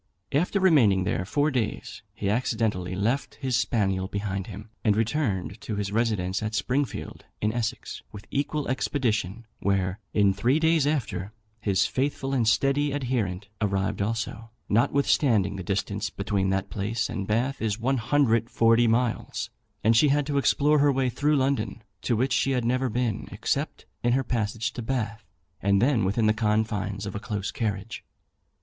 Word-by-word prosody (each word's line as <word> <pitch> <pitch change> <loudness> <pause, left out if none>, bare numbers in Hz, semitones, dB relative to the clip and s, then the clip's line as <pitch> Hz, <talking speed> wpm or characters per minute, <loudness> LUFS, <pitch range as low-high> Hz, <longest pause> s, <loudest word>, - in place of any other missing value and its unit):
After 175 +7 +1
remaining 125 - +5
there 95 0 -1
four 145 +9 +1
days, 115 -5 -3
he - - -3
accidentally 105 -5 0
left 115 +9 -1
his 130 -3 -1
spaniel 95 -6 +1
behind 100 -1 -3
him, 105 +1 -9
and 105 -3 +3
returned 110 -5 -1
to 110 - -4
his 100 -1 -2
residence 105 -5 0
at 110 0 -2
Springfield, 130 +1 -2
in 105 +1 0
Essex, 120 +1 -3
with 105 -1 -10
equal 145 +1 -1
expedition; 115 -5 -1
where, 95 -1 0
in 100 -2 +3
three 120 +9 +2
days 160 -2 +3
after, 110 - -2 0.3
his 100 -4 +2
faithful 135 0 -1
and 120 -5 +2
steady 140 +5 +2
adherent 115 -9 -2
arrived 100 0 0
also, 115 +1 -3 0.2
notwithstanding 115 -3 +2
the 95 - -5
distance 100 +2 -2
between 100 -2 -1
that 95 +1 -1
place 110 +2 -1
and 95 -1 -4
Bath 120 +6 0
is 110 -1 -1
140 115 -2 +3
miles, 115 +1 0 0.3
and 115 +2 +4
she 135 +7 +6
had 145 0 +2
to 140 -1 +1
explore 150 +2 +3
her 145 0 +5
way 130 -2 +1
through 150 +4 +1
London, 125 -6 0 0.2
to 120 - +1
which 130 +5 +1
she 135 - +2
had 125 -2 0
never 130 +2 +1
been, 120 -2 -1
except - - -2 0.2
in 120 0 +2
her 135 +1 +2
passage 115 -2 -2
to 120 - -5
Bath, 110 -4 -2 0.4
and 100 0 +3
then 125 -1 +3
within 105 +4 +1
the 110 - +4
confines 105 -2 -1
of 100 - -5
a 100 - -3
close 105 -3 -3
carriage. 105 0 -3
115 Hz, 160 wpm, -26 LUFS, 100-130 Hz, 0.4 s, she